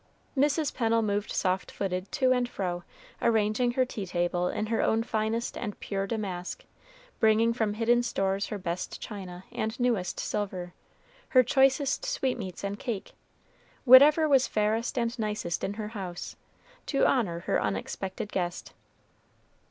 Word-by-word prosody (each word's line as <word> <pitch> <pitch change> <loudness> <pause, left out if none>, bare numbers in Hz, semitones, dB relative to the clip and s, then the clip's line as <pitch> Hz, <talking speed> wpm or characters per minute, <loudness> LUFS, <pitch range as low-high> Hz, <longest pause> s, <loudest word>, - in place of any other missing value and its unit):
Mrs. 290 +2 +2
Pennel 230 -2 +2
moved 205 0 -1
soft 185 0 0
footed 185 0 -3
to 260 -1 +3
and 250 -1 +2
fro, 175 -4 -3 0.4
arraying 225 +2 +2
her 255 +1 +2
tea 210 -6 -6
table 175 0 0
in 215 - -2
her 225 +1 0
own 225 +1 +2
finest 225 +1 -1
and 210 -4 -5
pure 195 -1 -3
damask, 190 -5 -4
and - - -28
bringing 220 +1 +4
from 220 -3 -1
hidden 235 +2 +3
stores 195 -4 -1
her 210 - -4
best 180 -1 -4
china 185 -4 -7
and 220 +4 -3
newest 235 -7 0
silver, 185 -4 -3 0.6
her 255 -4 +6
choicest 270 +2 +2
sweetmeats 225 -10 -2
and 200 +1 -3
cake 230 -7 -4 0.7
whatever 290 +5 +8
was 270 -3 +4
fairest 220 +4 0
and 235 0 -1
nicest 210 -6 -2
in 200 - -2
her 210 -1 -4
house 190 -5 -6 0.5
to 275 - +2
honor 185 -10 +1
her - - 0
unexpected 185 - -3
guest. 175 -2 -3
215 Hz, 145 wpm, -28 LUFS, 190-245 Hz, 0.7 s, whatever